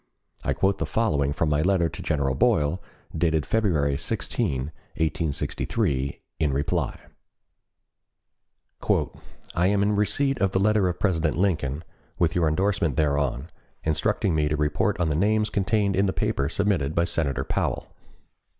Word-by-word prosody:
I - - +1
quote 95 0 +1
the - - -1
following 75 -12 +1
from 75 +2 0
my 75 0 +2
letter 90 -1 +2
to 80 0 -8
General 70 -4 0
Boyle, 75 +5 +2 0.3
dated 80 -2 +1
February 80 -11 +1
16, 65 +2 -2 0.3
1863, 70 -3 -1 0.2
in 75 -3 +2
reply: 70 +2 -1 2.5
"I 90 +1 +2
am 100 0 +2
in 105 +1 +2
receipt 135 +6 +1
of 95 -1 +2
the 95 - +2
letter 105 -1 +3
of 90 - -4
President 80 -6 +1
Lincoln, 80 -6 0 0.3
with 85 -1 +2
your 85 -2 +2
endorsement 85 -2 +1
thereon, 70 -1 0 0.3
instructing 85 +5 +1
me 75 -1 +2
to 75 +1 0
report 75 +3 0
on 85 -2 +1
the 75 - 0
names 105 +5 +2
contained 100 0 +1
in 100 +2 +2
the 95 - 0
paper 70 0 0
submitted 85 -6 0
by 85 - +3
Senator 80 -5 -1
Powell. - - -2
80 Hz, 145 wpm, -25 LUFS, 75-100 Hz, 2.5 s, letter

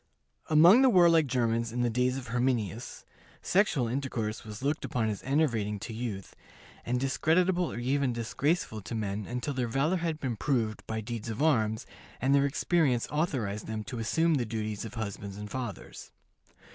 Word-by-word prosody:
Among 170 +10 +7
the 265 - +6
warlike 170 - +5
Germans 115 -2 0
in 120 +1 -2
the 120 - +2
days 125 +2 +1
of 125 -3 -7
Herminius, 120 -2 -2 0.4
sexual 175 - +2
intercourse 115 -4 -3
was 105 +2 -9
looked 145 +3 0
upon 110 -3 -1
as 105 - -4
enervating 120 -8 0
to 110 +3 -7
youth, 110 -4 -5 0.5
and 125 +1 -1
discreditable 175 +6 +2
or - - -6
even 130 +2 +1
disgraceful 120 +1 -1
to 115 - -6
men 105 -1 -3
until 125 +4 -3
their 125 -2 -1
valor 140 +10 +1
had 165 -2 -2
been 125 -6 -3
proved 115 -6 0
by 110 0 -3
deeds 115 0 -5
of 115 +6 -2
arms, 110 -8 +2 0.3
and 135 +2 +2
their 140 0 +4
experience 140 -4 +1
authorized 125 - -1
them 110 -1 -4
to 120 +2 -6
assume 160 +9 +2
the 135 -5 +1
duties 110 -1 -3
of 110 - -8
husbands 100 -3 -5
and 105 0 -7
fathers. 120 -7 -6
125 Hz, 170 wpm, -29 LUFS, 110-145 Hz, 0.5 s, Among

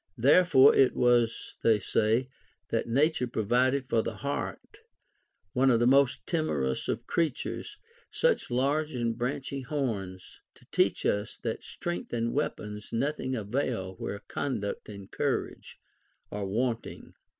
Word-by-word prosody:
Therefore 140 +2 +6
it 135 - +4
was, 120 -2 +2
they 115 -2 +4
say, 110 +4 +1 0.4
that - - -1
J^ature 130 0 +1
provided 125 +5 +1
for 115 - +2
the - - -4
hart, 140 0 -5 0.7
one 130 +1 +3
of 120 -3 +4
the 120 - +3
most 135 0 +3
timorous 70 - -1
of - - -2
creatures, 170 - -2 0.3
such 485 -1 +1
large 140 +4 0
and 115 -2 -1
branchy 135 +3 -3
horns, 110 - -4
to - - -21
teach - - +1
us 105 0 0
that - - -3
strength 85 +5 -5
and 115 0 -1
weapons 105 -7 -3
nothing 130 +1 -1
avail 110 -3 -2
where 100 - -5
conduct 110 -8 -3
and 100 -2 -10
courage - - -3 0.5
are 100 -1 -3
want 115 +3 -1
ing. - - -11
125 Hz, 135 wpm, -29 LUFS, 110-140 Hz, 0.7 s, Therefore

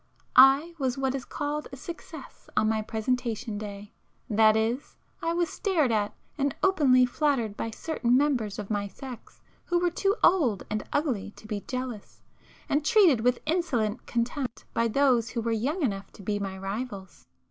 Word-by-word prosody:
I 275 +6 +7
was 260 -2 0
what 265 -1 0
is 270 -2 -4
called 295 +1 -3
a - - -7
'success' 335 +5 -10
on 215 - +4
my 220 0 +1
presentation 225 0 -2
day. 205 0 -8 0.4
That 215 0 +5
is, 230 +5 -2 0.2
I 330 - 0
was 345 0 +1
stared 325 - +1
at, 210 -2 0 0.2
and 280 -1 0
openly 275 -10 +5
flattered 250 -5 0
by 225 - -3
certain 245 0 0
members 260 -8 +1
of 210 0 -6
my 205 -1 -1
sex 250 +3 -11 0.2
who 350 - +1
were 350 0 +1
too 395 +3 +1
old 265 - +4
and 215 - 0
[p - - -9
410] - - -24
ugly 260 -10 -1
to - - -15
be 210 -2 -3
jealous, 255 -5 -6 0.4
and 290 +1 +1
treated 340 - +5
with 250 +1 +2
insolent 250 - -1
contempt 245 +1 -2
by 230 - +2
those 245 -1 +3
who 235 - -3
were 230 - 0
young 275 - -1
enough 195 -6 -2
to 200 - -13
be 205 +1 -1
my 195 -1 -4
rivals. 195 0 -6
245 Hz, 180 wpm, -27 LUFS, 215-290 Hz, 0.4 s, I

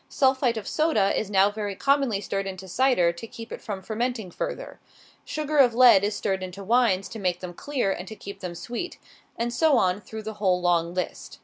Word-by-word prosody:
Sulphite 260 -3 +2
of 210 - -5
soda 305 -12 +2
is 215 - -2
now 200 0 +4
very 205 -2 -4
commonly 275 -4 +2
stirred 195 -1 -3
into 190 0 -7
cider, 185 -5 +3
to 170 +7 -9
keep 230 +1 -10
it - - -6
from 195 -3 -6
fermenting 225 -3 -3
further. - - -5 0.4
Sugar 305 -1 -2
of 245 -4 +5
lead 240 -6 +7
is 205 +1 0
stirred 190 -2 -1
into 185 +1 -7
wines 210 -3 +2
to 225 - -7
make 180 -3 0
them 180 -1 -7
clear, 250 -1 -1
and 185 0 -5
to 220 - -8
keep 200 -1 -9
them 180 -3 -6
sweet. 240 - -5 0.4
And 235 +1 -2
so 295 +2 +4
on, 185 -1 +1
through 220 +1 -8
the 220 +1 -5
whole 185 -3 +3
long 175 -1 +1
list. 180 - -4
210 Hz, 210 wpm, -25 LUFS, 190-245 Hz, 0.4 s, lead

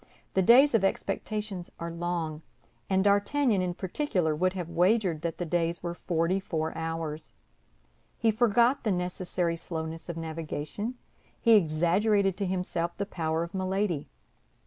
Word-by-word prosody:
The 190 - +3
days 250 +9 +7
of 225 -4 +3
expectation 205 0 -2 0.2
are 170 0 -4
long, 170 -2 -3 0.5
and 190 0 +3
D'Artagnan, 205 +2 +3
in 180 -1 -2
particular, 180 - -1
would 185 +4 +1
have 180 -3 -4
wagered 175 0 +2
that 170 -1 -3
the 175 - -3
days 170 0 -1
were 170 -1 -2
forty 175 +2 0
four 160 -4 -3
hours. 160 -1 -4 0.8
He 225 - +3
forgot 235 +3 +3
the 215 - +1
necessary 180 -1 -1
slowness 165 0 -6
of 170 - -4
navigation; 165 +7 -4 0.4
he 230 - +3
exaggerated 195 +3 +3
to 200 -1 -1
himself 180 -2 -2
the 200 - -1
power 165 -4 -1
of 170 +3 -8
Milady. 190 -4 -1
180 Hz, 145 wpm, -28 LUFS, 165-200 Hz, 0.8 s, days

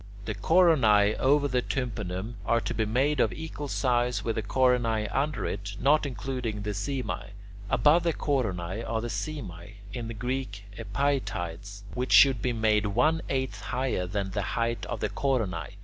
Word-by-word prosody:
The 110 - -2
coronae 110 - +4
over 145 +2 +3
the 125 -2 +1
tympanum 110 -5 -3
are 115 +4 +2
to 120 - -3
be 110 -1 0
made 135 +6 +1
of - - +3
equal 155 -2 -6
size 120 -5 0
with 115 - -1
the - - -1
coronae 115 -2 +2
under 140 -5 -1
it, 100 +1 -4
not 150 +1 +3
including 120 -4 -4
the 105 - -2
simae. 130 +5 -3 0.4
Above 150 +8 +4
the 170 0 +1
coronae 110 - -1
are 115 -1 -2
the 120 - -4
simae 100 - -6 0.2
(in 120 -2 -4
Greek 115 -1 -6
[Greek: 125 -5 -3
epaietides]), 100 -5 -2
which 125 +1 -1
should 135 -5 +7
be 125 - 0
made 110 -2 +2
one 150 +11 +2
eighth 130 -1 -2
higher 125 -8 -1
than 95 0 -2
the 100 - -1 0.2
height 115 0 -1
of - - -4
the - - 0
coronae. 120 -11 -1
120 Hz, 165 wpm, -28 LUFS, 105-135 Hz, 0.4 s, should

